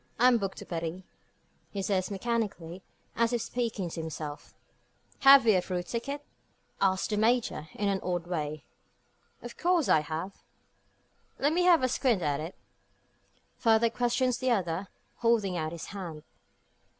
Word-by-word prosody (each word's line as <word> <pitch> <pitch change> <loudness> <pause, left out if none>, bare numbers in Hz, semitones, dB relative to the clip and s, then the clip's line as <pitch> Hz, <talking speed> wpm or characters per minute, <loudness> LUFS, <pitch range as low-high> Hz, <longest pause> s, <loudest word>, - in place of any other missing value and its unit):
"I'm 245 0 +5
booked 195 -2 -3
to - - -8
Paris," 170 +2 -4 0.7
he 200 -1 -4
says 190 -1 0
mechanically, 200 -5 -3 0.3
and 230 - +1
as 230 - -2
if 240 - +1
speaking 230 -6 -2
to 165 - -4
himself. 155 -2 -7 0.6
"Have 275 -2 +8
you 210 -5 +5
a - - -2
through 180 -1 -3
ticket?" 275 +9 -4 0.6
asks 190 -1 +2
the 210 - 0
Major, 220 -8 +1
in 205 - -1
an 195 -1 +1
odd 175 -2 -2
way. 155 -3 -3 0.8
"Of - - -9
course 350 -3 +2
I - - +6
have." 160 +6 -5 1.0
"Let 290 +3 +2
me 355 +1 +2
have 340 -6 +6
a - - +4
squint 245 -6 +1
at 145 -1 0
it?" 160 +4 -6 1.0
further 225 -1 +3
questions 245 +1 +1
the 260 0 0
other, 190 -4 0 0.3
holding 225 -5 +2
out 155 -2 -2
his 170 -1 -7
hand. 170 -6 -7
200 Hz, 155 wpm, -29 LUFS, 170-240 Hz, 1.0 s, Have